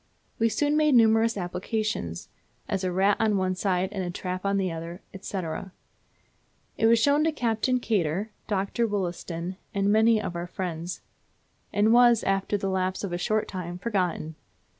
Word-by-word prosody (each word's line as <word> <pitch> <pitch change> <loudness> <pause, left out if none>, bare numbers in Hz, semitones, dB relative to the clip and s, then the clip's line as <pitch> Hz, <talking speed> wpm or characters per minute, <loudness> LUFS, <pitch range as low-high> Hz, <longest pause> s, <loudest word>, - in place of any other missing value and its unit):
We 230 0 +3
soon 295 +6 +1
made 305 -3 +4
numerous 225 -1 +4
applications, 180 - -3 0.4
as 195 -1 -2
a 185 - 0
rat 195 +3 +3
on 215 -2 +2
one 185 -1 +1
side 185 0 0
and 195 -2 -3
a 175 - -3
trap 185 +1 -4
on 200 0 +2
the 190 -2 0
other, 165 +2 -7 0.2
&c. 200 - -5 1.4
It 225 - +3
was 230 +1 +6
shown 285 +6 +3
to 320 - +2
Captain 250 -2 0
Kater, 200 -2 -1 0.2
Dr. 205 +3 0
Wollaston, 180 -3 -3 0.2
and 200 +1 +2
many 220 +1 +5
of 180 - -4
our 170 +1 -4
friends, 175 -1 -5 0.7
and 210 +2 +3
was, 240 -2 +6
after 195 +1 0
the 195 - -3
lapse 185 0 -1
of 190 -3 -3
a 175 - -2
short 215 +4 0
time, 175 -2 -5
forgotten. 180 -6 -1
195 Hz, 165 wpm, -26 LUFS, 180-225 Hz, 1.4 s, was